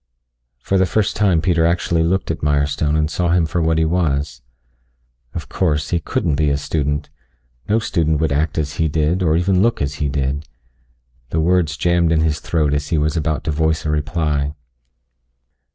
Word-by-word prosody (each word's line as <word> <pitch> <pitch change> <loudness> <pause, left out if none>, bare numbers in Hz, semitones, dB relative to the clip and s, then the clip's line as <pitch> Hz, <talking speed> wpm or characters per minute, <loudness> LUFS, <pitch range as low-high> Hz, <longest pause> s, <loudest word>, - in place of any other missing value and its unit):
For 95 +10 0
the 95 - +3
first 105 +2 0
time 95 -6 +2
Peter 85 -2 +2
actually 85 0 +1
looked 90 +3 0
at - - -5
Mirestone 75 +1 +1
and 75 0 +1
saw 85 +2 -1
him 85 -1 +3
for 80 +2 -1
what 80 0 +1
he 80 - +2
was. 75 -5 -1 0.9
Of - - -5
course, 75 -6 -1
he 85 - +2
couldn't 75 -3 -1
be 75 0 +2
a 70 - +1
student. 75 0 -2 0.6
No 110 - +3
student 80 -8 0
would 80 -2 0
act 75 +2 0
as 75 -1 -2
he 80 - +2
did, 80 +4 0
or 80 -3 +2
even 90 +1 +2
look 115 +3 +2
as 70 0 -3
he 70 - +1
did. 70 +1 -2 0.8
The 80 - -1
words 80 -1 +1
jammed 85 -1 +2
in 80 -1 +3
his 80 -1 0
throat 75 -3 0
as 75 0 -1
he 80 - 0
was 75 +1 0
about 80 -1 -1
to - - -1
voice 80 +1 0
a 75 - 0
reply. 75 -1 -1
80 Hz, 190 wpm, -19 LUFS, 75-85 Hz, 0.9 s, the